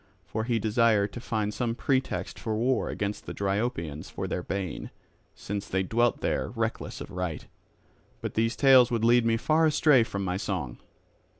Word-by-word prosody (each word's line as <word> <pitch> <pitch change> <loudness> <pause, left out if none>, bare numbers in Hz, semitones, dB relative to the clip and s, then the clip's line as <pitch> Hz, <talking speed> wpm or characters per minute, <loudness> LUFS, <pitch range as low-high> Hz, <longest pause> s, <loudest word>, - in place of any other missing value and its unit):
For 110 0 -3
he 120 -1 +1
desired 110 -2 +2
to - - -6
find 110 -4 -2
some 115 -1 -1
pretext 130 +1 -1
for 110 -2 -2
war 125 +4 +1
against 105 0 -4
the - - -5
Dryopians 95 - -2
for - - -4
their 90 - -2
bane, 95 -2 -4 0.5
since 100 0 -5
they 95 0 0
dwelt 115 +5 +1
there - - -1
reckless - - -3
of - - -8
right. 90 -4 -4 0.7
But - - -5
these 115 +2 +1
tales 130 -2 +6
would 115 -2 0
lead 120 0 +5
me 115 0 +3
far 160 +6 +3
astray 150 -3 +5
from 100 -3 -4
my 90 0 -1
song. 90 -11 -4
110 Hz, 175 wpm, -28 LUFS, 100-120 Hz, 0.7 s, tales